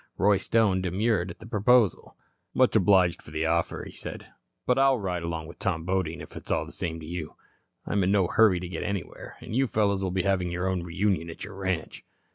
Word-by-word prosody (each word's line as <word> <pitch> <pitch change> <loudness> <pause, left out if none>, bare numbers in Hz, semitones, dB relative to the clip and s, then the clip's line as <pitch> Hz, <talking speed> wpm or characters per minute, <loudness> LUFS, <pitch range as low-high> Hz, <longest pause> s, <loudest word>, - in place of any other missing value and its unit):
Roy 100 0 +4
Stone 100 -4 +2
demurred 95 +1 0
at 85 - -8
the 110 - -12
proposal. 110 -1 +2 0.4
"Much 130 -2 +3
obliged 95 -4 +4
for - - -14
the 80 +1 -2
offer," 85 +1 0
he - - -9
said, - - -8 0.4
"but 125 +1 +2
I'll 135 -1 +5
ride 90 -5 -2
along 80 -1 -4
with 85 - -12
Tom 85 -4 -1
Bodine, 90 -2 -1
if - - -11
it's - - -9
all - - +1
the - - -11
same 80 -1 -4
to - - -8
you. 80 -1 -6 0.5
I'm 100 -1 +1
in 95 - +2
no 100 -2 +4
hurry 105 0 +4
to 90 - -5
get 85 -2 -5
anywhere, 100 -3 -5
and 110 - -6
you 135 +1 +3
fellows 100 -3 +1
will 95 - -1
be 90 0 -1
having 95 -3 +1
your 90 +2 -2
own 95 -1 0
reunion 85 0 -1
at 80 - -8
your 100 +2 -8
ranch. 95 -3 -3
95 Hz, 225 wpm, -27 LUFS, 85-105 Hz, 0.5 s, I'll